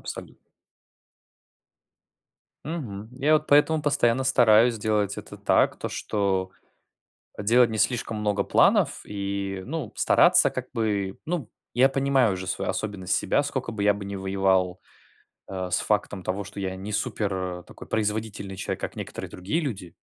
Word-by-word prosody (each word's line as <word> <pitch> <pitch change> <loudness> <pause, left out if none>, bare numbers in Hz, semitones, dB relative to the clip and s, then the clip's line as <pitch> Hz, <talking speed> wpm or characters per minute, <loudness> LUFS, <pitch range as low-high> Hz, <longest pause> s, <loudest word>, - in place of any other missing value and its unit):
абсолют - - -8 2.3
Мгм. 115 -10 -5
Я 145 +4 +2
вот 155 0 +1
поэтому 150 +2 +4
постоянно 130 -3 +2
стараюсь 115 -2 +5
делать 105 -2 0
это - - -9
так, - - +2
то, - - -4
что 95 -3 -1 0.9
делать 115 +3 +4
не 110 - -3
слишком 115 -2 +1
много 105 -1 0
планов - - +3
и, 100 -1 -4
ну, 145 -7 -4
стараться - - +5
как 130 0 -6
бы 105 -5 -1
Ну, 160 -7 -3 0.2
я 130 +2 +5
понимаю 135 -4 +2
уже 95 0 -6
свою - - -2
особенность, 100 -3 -2
себя, 145 - +2
сколько 130 -4 -3
бы 105 -2 -4
я 105 0 +5
бы 100 0 -7
не 100 0 -5
воевал, 95 -1 +1 0.7
а, 95 -1 -4
с 90 - +2
фактом 100 -2 -1
того, 95 +3 -3
что 100 +1 -8
я 95 -1 -3
не 100 +3 -6
супер, 100 0 -1 0.3
э, - - -14
такой - - -12
производительный 105 -2 -2
человек, - - -4
как - - -5
некоторые - - -6
другие 95 - -2
люди 100 - -5
105 Hz, 150 wpm, -25 LUFS, 100-125 Hz, 2.3 s, стараюсь